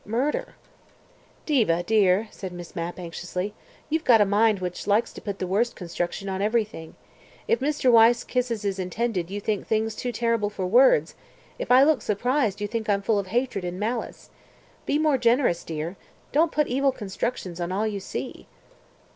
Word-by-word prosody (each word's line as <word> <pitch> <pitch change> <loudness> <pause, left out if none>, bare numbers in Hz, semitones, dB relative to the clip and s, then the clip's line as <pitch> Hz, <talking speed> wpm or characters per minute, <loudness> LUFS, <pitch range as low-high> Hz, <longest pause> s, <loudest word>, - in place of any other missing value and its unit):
Murder." 275 - -2 0.9
"Diva 215 - +2
dear," 210 0 +3
said 190 -2 -7
Miss 175 -1 -10
Mapp 170 +1 -4
anxiously, 180 +3 -5 0.3
"you've 320 +1 -1
got 235 -6 +6
a 210 - +5
mind 210 +2 +3
which 180 +1 -5
likes 215 +3 +2
to - - -10
put 200 -2 -5
the 185 - -3
worst 215 +6 0
construction 175 +2 -4
on 190 0 -2
everything. 210 -6 -1 0.5
If 465 - +2
Mr. 285 -3 +2
Wyse 230 +1 +6
kisses 240 -4 -2
his 195 -1 -2
intended 185 -1 -2
you 200 +1 -4
think 205 -1 -2
things 220 0 0
too 250 - -4
terrible 230 -2 0
for 200 -3 -4
words; 195 - +4 0.5
if - - -4
I 255 +2 +7
look 300 -1 +3
surprised 220 0 0
you 205 - -1
think 220 0 -4
I'm 200 -1 +1
full 210 0 +2
of 195 - -4
hatred 240 -1 -1
and 180 +1 -4
malice. 230 +3 -4 0.6
Be 290 - +2
more 305 -3 +2
generous, 235 -7 +2
dear. 160 +3 -5 0.3
Don't 320 +2 +3
put 300 0 +2
evil 270 +2 +1
constructions 195 -5 -4
on 175 +1 -2
all 200 +4 0
you 210 -2 -2
see." 195 - -6
215 Hz, 180 wpm, -25 LUFS, 190-245 Hz, 0.9 s, I